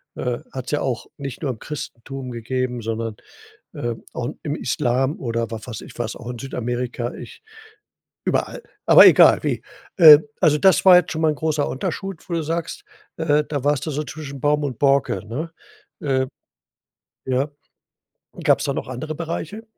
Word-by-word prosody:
Äh, 125 Hz, 0 st, -2 dB
hat's 130 Hz, 0 st, -6 dB
ja 150 Hz, -, 0 dB
auch 120 Hz, -3 st, -2 dB
nicht 140 Hz, -3 st, -7 dB
nur 135 Hz, -, 0 dB
im 115 Hz, -, -9 dB
Christentum 135 Hz, -3 st, -7 dB
gegeben, 125 Hz, +1 st, -3 dB
sondern, 115 Hz, 0 st, -3 dB, 0.6 s
äh, 120 Hz, -1 st, -3 dB, 0.2 s
auch 120 Hz, +1 st, -3 dB
im 145 Hz, -1 st, -2 dB
Islam 130 Hz, +1 st, 0 dB
oder 115 Hz, -2 st, -2 dB
wa 115 Hz, -, -4 dB
weiß 115 Hz, -4 st, -7 dB
ich, -, -, -12 dB
was 120 Hz, -2 st, -3 dB
auch 120 Hz, -1 st, -9 dB
in 125 Hz, -, -5 dB
Südamerika 120 Hz, -1 st, -3 dB
ich -, -, -11 dB, 0.9 s
überall. -, -, -1 dB, 0.2 s
Aber -, -, +9 dB
egal -, -, +7 dB
wie. -, -, -1 dB, 0.4 s
Äh, 155 Hz, -5 st, +11 dB, 0.2 s
also 155 Hz, -4 st, +4 dB
das 190 Hz, +4 st, +4 dB
war 185 Hz, -1 st, +10 dB
jetzt 180 Hz, -, +4 dB
schon 160 Hz, 0 st, -3 dB
mal 160 Hz, -, +4 dB
'n -, -, -4 dB
großer 155 Hz, -1 st, 0 dB
Unterschied, 190 Hz, +6 st, -5 dB
wo 170 Hz, -, -3 dB
du 165 Hz, -, 0 dB
sagst, 165 Hz, -, -4 dB, 0.3 s
äh, 150 Hz, -2 st, +2 dB
da 140 Hz, -3 st, -3 dB
warst 145 Hz, -2 st, +1 dB
du 155 Hz, -, -3 dB
so 150 Hz, +2 st, -2 dB
zwischen 145 Hz, -3 st, -8 dB
Baum 150 Hz, +1 st, +1 dB
und 130 Hz, -5 st, -4 dB
Borke, 140 Hz, -5 st, +2 dB
ne? 155 Hz, +9 st, -4 dB, 0.5 s
Äh. 130 Hz, -2 st, 0 dB, 1.0 s
Ja. 130 Hz, +3 st, 0 dB, 0.9 s
Gab's -, -, +3 dB
da -, -, 0 dB
noch -, -, -4 dB
andere 155 Hz, +5 st, -5 dB
Bereiche? 170 Hz, +6 st, -5 dB
135 Hz, 175 wpm, -22 LUFS, 120-155 Hz, 1.0 s, Äh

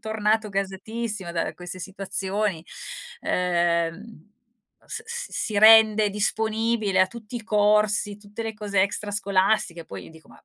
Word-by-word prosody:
Tornato 220 Hz, 0 st, 0 dB
gasatissimo 195 Hz, 0 st, -4 dB
da 165 Hz, -1 st, -2 dB
queste 180 Hz, +1 st, -7 dB
situazioni, 195 Hz, -1 st, -3 dB, 0.6 s
ehm, 170 Hz, -2 st, +1 dB
uhm, 215 Hz, -3 st, -14 dB, 0.6 s
s 450 Hz, -, -3 dB
s 480 Hz, +2 st, -1 dB
si 210 Hz, -3 st, 0 dB
rende 215 Hz, -1 st, +7 dB
disponibile 220 Hz, -1 st, +1 dB
a 185 Hz, -, +5 dB
tutti 235 Hz, +3 st, -9 dB
i 230 Hz, -, -6 dB
corsi, 210 Hz, -1 st, +2 dB
tutte 205 Hz, +2 st, -8 dB
le 225 Hz, 0 st, -4 dB
cose 205 Hz, -3 st, 0 dB
extrascolastiche, 200 Hz, -3 st, 0 dB
poi 95 Hz, -1 st, -8 dB
io -, -, -13 dB
dico: 160 Hz, 0 st, -18 dB
"Ma -, -, -19 dB
205 Hz, 140 wpm, -24 LUFS, 190-220 Hz, 0.6 s, rende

